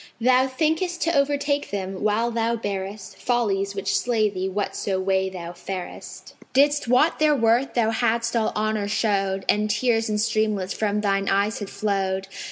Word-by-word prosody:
Thou 255 +2 +4
thinkest 320 +6 -1
to 335 0 +1
overtake 285 0 +1
them, 190 -1 -4
while 215 +3 +1
thou 230 0 0
bearest 200 -2 -5
Follies, 200 -5 0
which 195 0 -1
slay 220 -4 +1
thee 190 0 -3
whatso 195 0 -2
way 190 0 +1
thou 175 -2 -7
farest. 180 +1 -8 0.2
Didst 290 0 +3
wot 255 +7 +3
their 305 -1 +4
worth 235 +1 +2
thou 225 -2 +2
hadst 230 0 0
all 225 -2 +1
honour 215 -1 0
showed, 195 -2 0
And 210 +1 +2
tears 225 +1 +1
in 210 - 0
streamlets 215 -3 0
from 210 -1 -1
thine 195 -1 0
eyes 200 +3 +1
had 205 -2 -6
flowed. 195 -2 -1
215 Hz, 165 wpm, -24 LUFS, 195-240 Hz, 0.2 s, Thou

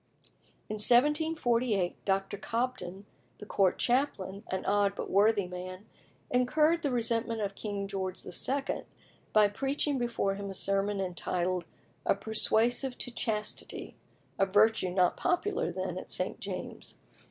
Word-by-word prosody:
In 215 - -4
1748 245 - +3
Dr. 195 +1 0
Cobden, 205 -4 -3 0.3
the 210 - -9
Court 195 -3 +2
chaplain, 240 -7 0
an 190 - -3
odd 200 -1 +2
but - - -5
worthy 205 0 +4
man, 185 +2 -7 0.5
incurred 300 +7 +3
the 290 - 0
resentment 230 -2 0
of 200 -2 -2
King 200 -1 -4
George 190 -2 -4
II. 275 +1 -1 0.5
by 215 -1 +6
preaching 275 +6 -1
before 235 -5 0
him 200 0 -5
a 195 - -5
sermon 195 +1 0
entitled 180 -1 -2 0.4
"A - - +2
Persuasive 225 +5 +1
to 245 - -1
Chastity" 215 -2 -3 0.4
a 195 - +4
virtue 205 0 +4
not 180 -1 +2
popular 365 +3 0
then - - -3
at - - -10
St. - - -1
James's. - - -7
210 Hz, 130 wpm, -30 LUFS, 195-245 Hz, 0.5 s, by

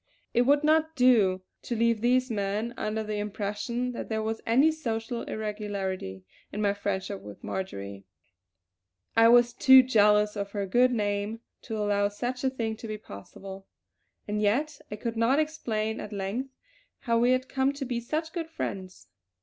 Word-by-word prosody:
It 240 - +4
would 290 +1 +4
not 315 +1 +3
do 215 -8 +4 0.2
to 240 - -4
leave 230 -1 +2
these 250 +1 +2
men 210 +2 -2
under 215 +1 -2
the 210 -1 -3
impression 210 +4 -3
that 240 - -6
there 220 -1 -1
was 225 +1 -3
any 265 +8 +5
social 235 -5 -3
irregularity 200 - -4 0.3
in 210 - -5
my 205 -1 +2
friendship 200 -1 -3
with 105 -1 -11
Marjory; 100 - -5 1.1
I 225 0 +7
was 240 0 +6
too 265 +1 +8
jealous 210 -3 +4
of 200 -1 -4
her 200 -2 -1
good 245 +6 +3
name 205 0 -1 0.2
to 220 -3 -5
allow 205 -1 +1
such 245 +5 -4
a 265 - +3
thing 230 -4 -3
to 225 - -8
be 215 0 -4
possible. 195 - -10 0.6
And 210 0 -1
yet 280 +8 0
I 210 - -4
could 225 +2 -4
not 230 +5 +3
explain 225 -9 -1
at 210 - -7
length 205 +7 -3 0.5
how 230 -2 +1
we 240 +1 +3
had 255 +1 -1
come 270 0 +1
to 280 -1 -5
be 245 -2 -2
such 310 +7 -3
good 330 -3 -4
friends. 190 - -6
220 Hz, 170 wpm, -28 LUFS, 205-250 Hz, 1.1 s, too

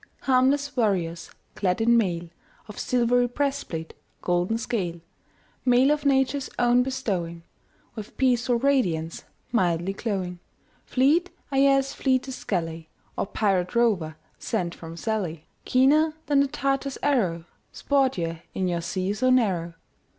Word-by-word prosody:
Harmless 275 +2 +2
warriors, 185 -8 0 0.2
clad 180 -2 0
in 235 +1 +4
mail 175 -7 +1 0.4
Of 210 - -9
silver 245 0 +2
breastplate, 255 - -3 0.3
golden 180 +5 +1
scale; 185 -7 -3 0.6
Mail 255 +2 +4
of 300 -1 0
Nature's 270 0 +1
own 245 0 +4
bestowing, 190 -11 -3 0.5
With 215 -2 -9
peaceful 250 -2 +2
radiance, 215 - 0 0.3
mildly 180 -4 +1
glowing 190 -4 -3 0.5
Fleet 305 +8 +3 0.2
are 270 - +1
ye 275 - +6
as 275 0 +2
fleetest 260 -1 -1
galley 165 -4 -2 0.3
Or - - -2
pirate 195 -2 0
rover 190 -10 +1 0.2
sent 180 -7 -2
from 165 0 -10
Sallee; 180 -7 -3 0.2
Keener 300 +5 +3
than 285 -1 +3
the 280 - +3
Tartar's 275 -1 -2
arrow, 190 - +1 0.3
Sport 270 -4 +1
ye 165 -1 -3
in 185 - 0
your 170 -1 -1
sea 185 +3 -2
so 255 +5 +1
narrow. 185 -10 +1
230 Hz, 130 wpm, -25 LUFS, 175-265 Hz, 0.6 s, ye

